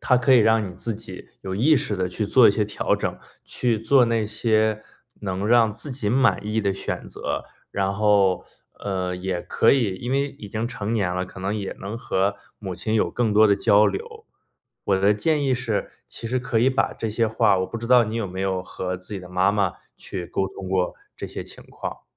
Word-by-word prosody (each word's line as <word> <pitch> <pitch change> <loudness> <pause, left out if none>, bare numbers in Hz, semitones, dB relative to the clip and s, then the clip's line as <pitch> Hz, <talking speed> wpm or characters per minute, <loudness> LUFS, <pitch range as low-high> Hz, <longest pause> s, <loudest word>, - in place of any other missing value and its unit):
它 125 - +3
可 125 +2 +3
以 - - +7
让 110 -2 +3
你 90 - -10
自 115 +5 -3
己 100 -3 -10
有 95 -1 -4
意 145 +9 +4
识 105 - -1
地 90 -1 -1
去 105 +3 -3
做 120 +1 +6
一 - - +6
些 105 +1 0
调 105 - 0
整， - - -3 0.3
去 120 -3 -1
做 125 +3 +4
那 115 -2 0
些 110 0 +1 0.4
能 95 0 -3
让 115 -2 +4
自 135 +6 -7
己 120 -5 -2
满 130 -2 +2
意 105 +1 0
的 100 -2 0
选 - - -5
择。 - - -4 0.3
然 95 -1 0
后， 100 -3 +3 0.4
呃， 95 -2 -2
也 90 -1 -3
可 - - +2
以 115 -8 +1
因 120 +6 -5
为 140 +2 +1
已 125 -7 -11
经 110 +3 -2
成 115 -2 -4
年 95 -5 0
了， 90 0 -1
可 95 - -12
能 100 +3 -1
也 100 -2 -4
能 100 +4 -5
和 100 -4 0 0.2
母 95 -4 -5
亲 110 +5 -2
有 110 - +2
更 115 -3 0
多 110 +1 +6
的 100 - +4
交 105 +1 +5
流。 100 -1 -5 0.6
我 95 - +2
的 100 +2 +4
建 150 +6 +1
议 130 -2 +2
是， 115 -4 -2
其 115 - -8
实 130 +2 0
可 120 -2 0
以 125 +3 +4
把 135 0 +1
这 115 - -4
些 115 +2 +1
话 110 -3 +3
我 95 - -1
不 115 - -6
知 115 - -5
道 125 -1 +6
你 110 +2 -4
有 115 -3 -1
没 95 +1 -8
有 95 -1 0
和 90 0 -4
自 90 +3 -10
己 95 - -4
的 90 - -11
妈 90 +3 +2
妈 100 -3 +1 0.2
去 90 -3 -6
沟 95 - -1
通 95 -1 -8
过 95 -1 0 0.2
这 - - -5
些 - - -6
情 - - -12
况。 - - -7
105 Hz, 245 characters per minute, -23 LUFS, 95-115 Hz, 0.6 s, 以